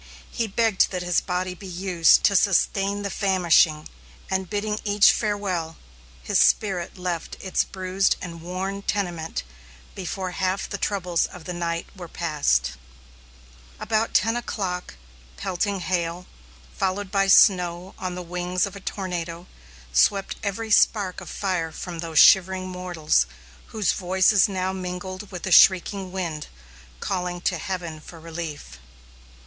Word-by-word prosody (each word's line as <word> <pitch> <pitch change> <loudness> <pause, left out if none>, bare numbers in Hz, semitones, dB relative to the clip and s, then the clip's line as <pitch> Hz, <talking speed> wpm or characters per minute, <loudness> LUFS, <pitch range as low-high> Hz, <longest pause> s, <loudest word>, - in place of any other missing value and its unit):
He 230 -2 -1
begged 220 -1 +2
that 180 -2 -4
his 175 -1 +1
body 180 0 -2
be 190 +2 -11
used 180 -2 +3
to 200 - +4
sustain 200 +1 +2
the 200 - -3
famishing, 170 -5 +3 0.4
and 190 -1 -1
bidding 210 +1 -2
each 205 -1 +5
farewell, 190 -7 -2 0.5
his - - +1
spirit 190 -5 +2
left 180 -2 -4
its 190 -2 0
bruised 190 0 0
and 170 -2 -8
worn 190 +3 -4
tenement 175 - -3 0.5
before 190 0 -4
half 185 +2 -1
the 205 - -5
troubles 180 -4 0
of 180 - -12
the 180 - -5
night 170 -1 -2
were 180 -3 -8
passed. 145 - 0 1.1
About 220 0 -1
ten 225 +2 +3
o'clock, 190 - -4 0.4
pelting 190 - -2
hail, 175 0 -2 0.5
followed 190 - -2
by 195 -1 +2
snow 180 -2 +4
on 185 -1 -4
the 180 - -5
wings 180 +1 -1
of 200 - -8
a - - -8
tornado, 175 -3 -5 0.5
swept 195 - +2
every 220 +2 -3
spark 200 -3 +3
of - - -9
fire 180 -5 -2
from 175 -1 -7
those 165 -1 -4
shivering 190 0 +6
mortals, 175 - 0 0.4
whose 215 -4 0
voices 190 +2 +3
now 190 -1 -2
mingled 185 +1 -6
with 180 -2 -7
the 190 - -3
shrieking 190 +1 +5
wind, 170 -5 -4 0.5
calling 180 - -3
to 180 -1 0
heaven 170 -3 -5
for 165 +1 -12
relief. 165 -2 -7
185 Hz, 140 wpm, -24 LUFS, 175-195 Hz, 1.1 s, shivering